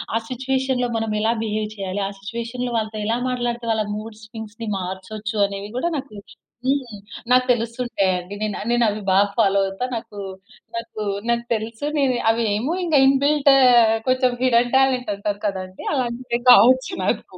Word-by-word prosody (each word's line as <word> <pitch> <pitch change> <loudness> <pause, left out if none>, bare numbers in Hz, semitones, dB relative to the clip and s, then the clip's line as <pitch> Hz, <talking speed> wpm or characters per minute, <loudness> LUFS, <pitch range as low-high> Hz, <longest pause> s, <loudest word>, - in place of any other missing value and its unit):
ఆ - - +3
సిట్యుయేషన్‌లో 260 0 -1
మనం 225 -1 -2
ఎలా 225 +2 +2
బిహేవ్ 215 -1 -2
చేయాలి, 195 0 -4
ఆ - - -4
సిట్యుయేషన్‌లో 235 +4 -4
వాళ్ళతో 215 -1 -3
ఎలా 230 +2 0
మాట్లాడితే 240 -1 -2
వాళ్ళ 215 -1 -1
మూడ్ 215 0 -8
స్వింగ్స్‌ని 220 0 -8
మార్చొచ్చు 205 +4 -5
అనేవి 200 +1 -7
గూడా 340 +7 0
నాకు 270 -6 -7 0.5
హ్మ్. 260 -6 -1 0.3
నాకు 255 0 +5
తెలుస్తుంటాయండి. 220 -6 -1
నేన్ 215 -1 -1
అవి - - -6
నేను 240 -1 +3
అవి 210 +1 -3
బాగా 195 +2 +5
ఫాలో 200 -3 +3
అవుతా. 195 +5 -3
నాకు 225 -2 -6 0.6
నాకు 230 -1 -6 0.3
నాకు 235 0 +1
తెలుసు. 225 +4 -4
నేను 270 -3 +2 0.2
అవి 230 +1 +2
ఏమో 240 +10 -1
ఇంగా 325 -4 +2
ఇన్బిల్ట్ 280 +2 +3 0.6
కొంచెం 255 -1 +2
హిడెన్ 245 -1 +3
టాలెంట్ 260 -3 +2
అంటారు 200 0 -3
కదా 195 -2 -1
అండి. 185 0 -12
అలాంటివి 245 -2 -2
కావచ్చు 260 - +6
నాకు. - - -2
230 Hz, 160 wpm, -22 LUFS, 210-255 Hz, 0.6 s, కావచ్చు